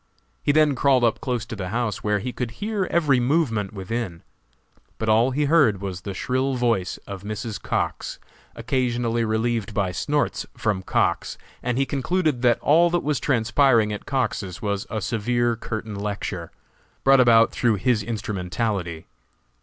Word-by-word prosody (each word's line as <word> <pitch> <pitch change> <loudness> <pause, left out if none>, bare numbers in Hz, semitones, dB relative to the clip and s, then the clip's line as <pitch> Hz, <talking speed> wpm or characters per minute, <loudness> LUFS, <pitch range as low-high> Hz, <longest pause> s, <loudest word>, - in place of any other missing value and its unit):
He - - +2
then 150 -1 +4
crawled 130 -1 +3
up 115 -2 +2
close 125 -4 -2
to - - -7
the 95 -3 -5
house, 115 -2 -2
where 105 0 +2
he 120 +5 -4
could 125 -2 -3
hear 210 -2 -1
every 150 -7 +3
movement 120 - +1
within; 95 -2 -4 0.7
but 110 - -2
all 115 +4 +4
he 145 +3 0
heard 140 - +4
was 95 -2 -5
the 95 +1 -6
shrill 130 +5 0
voice 115 -7 0
of 100 -2 -7
Mrs. 110 +1 -5
Cox, - - -2 0.4
occasionally 120 -1 0
relieved 110 -1 -1
by 95 -3 0
snorts 145 +10 -1
from 105 -4 0
Cox, - - 0 0.2
and 125 0 -1
he 135 - +2
concluded 145 0 0
that 120 -2 +3
all 170 +4 +5
that 175 0 0
was 150 -2 0
transpiring 115 -3 +3
at 105 - -7
Cox's 110 -9 -2
was 100 -2 -2
a 110 - -3
severe 120 +2 0
curtain 110 -1 -5
lecture, 100 -4 -4 0.5
brought 135 0 +6
about 115 -2 +6
through 115 -3 +1
his 110 +3 +1
instrumentality. 100 -4 -3
115 Hz, 160 wpm, -24 LUFS, 105-130 Hz, 0.7 s, brought